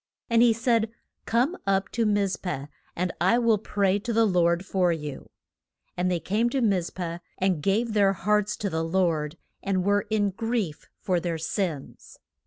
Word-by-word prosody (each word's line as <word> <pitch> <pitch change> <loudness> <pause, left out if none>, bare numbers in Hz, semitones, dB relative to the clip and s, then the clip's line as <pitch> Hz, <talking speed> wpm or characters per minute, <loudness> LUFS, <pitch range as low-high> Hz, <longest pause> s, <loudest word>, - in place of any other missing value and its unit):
And 230 0 +5
he 240 -1 +6
said, 230 -1 +1 0.4
Come 250 +10 +2
up 195 -1 +1
to 230 -2 0
Miz 205 -2 +1
peh, 160 -7 -4 0.3
and 180 0 -1
I 190 +7 +4
will 230 -3 +3
pray 200 -1 +1
to 235 +4 -4
the 225 0 +4
Lord 175 -2 +2
for 185 -3 +2
you. 150 -4 -5 0.7
And 180 +1 0
they 180 -2 0
came 215 +7 0
to 270 - -1
Miz 195 -7 +1
peh, 170 -2 -5 0.2
and 185 -5 +1
gave 215 +6 +1
their 200 -2 +4
hearts 210 +2 0
to 205 - -2
the 160 0 -1
Lord, 165 -3 0 0.2
and 190 -2 0
were 205 +1 +1
in 205 -2 +1
grief 225 -6 -3
for 185 -4 0
their 170 -1 -2
sins. 160 -2 -4
195 Hz, 180 wpm, -26 LUFS, 175-220 Hz, 0.7 s, he